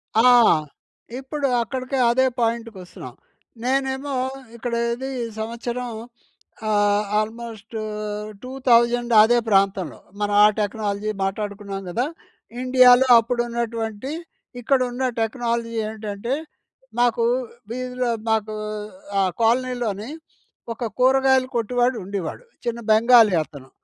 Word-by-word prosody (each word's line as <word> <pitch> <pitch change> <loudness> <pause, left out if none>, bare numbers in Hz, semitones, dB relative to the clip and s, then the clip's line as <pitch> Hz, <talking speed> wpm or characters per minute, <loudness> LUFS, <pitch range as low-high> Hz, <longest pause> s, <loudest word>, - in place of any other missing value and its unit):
ఆ! 220 - +5 1.0
ఇప్పుడు 280 +1 -2 0.2
అక్కడికి 255 +3 -4
అదే 260 +2 +3
పాయింట్‌కి 230 -2 -1
వస్తున్నాం. 180 - -11 0.5
నేనేమో 265 +2 -1 0.4
ఇక్కడ 235 0 -5 0.2
ఇది 265 +3 -5
ఈ - - -1 0.2
సంవత్సరం 235 +2 -4 0.8
ఆహ్, 205 0 +3 0.2
ఆల్మోస్ట్ 225 0 -6 0.7
2000 240 -2 +2
అదే 240 +2 +4
ప్రాంతంలో 195 -4 +1 0.2
మనం 205 0 -1
ఆ - - +9
టెక్నాలజీ 210 0 -2
మాట్లాడుకున్నాం 200 0 -4
కదా! 240 +9 0 0.6
ఇండియాలో 255 0 +6
అప్పుడు 240 +1 -1
ఉన్నటువంటి 230 +1 -3 0.5
ఇక్కడ 270 +3 +2
ఉన్న 250 +2 -3 0.2
టెక్నాలజీ 230 0 -2 0.2
ఏంటంటే, 215 +2 -4 0.7
మాకు 240 -1 +2 0.5
వీధిలో 250 0 -2 0.2
మాకూ 220 -1 0 0.7
ఆ - - +3 0.2
కాలనీలోని 235 -2 0 0.6
ఒక 235 - -5
కూరగాయలు 265 0 +4
కొట్డు‌వాడు 245 +2 +1
ఉండేవాడు. 200 - -5 0.2
చిన్న 235 0 -2
బెంగాలీ 225 -2 +6
అతను. 135 -3 -14
235 Hz, 100 wpm, -22 LUFS, 215-250 Hz, 1.0 s, ఆ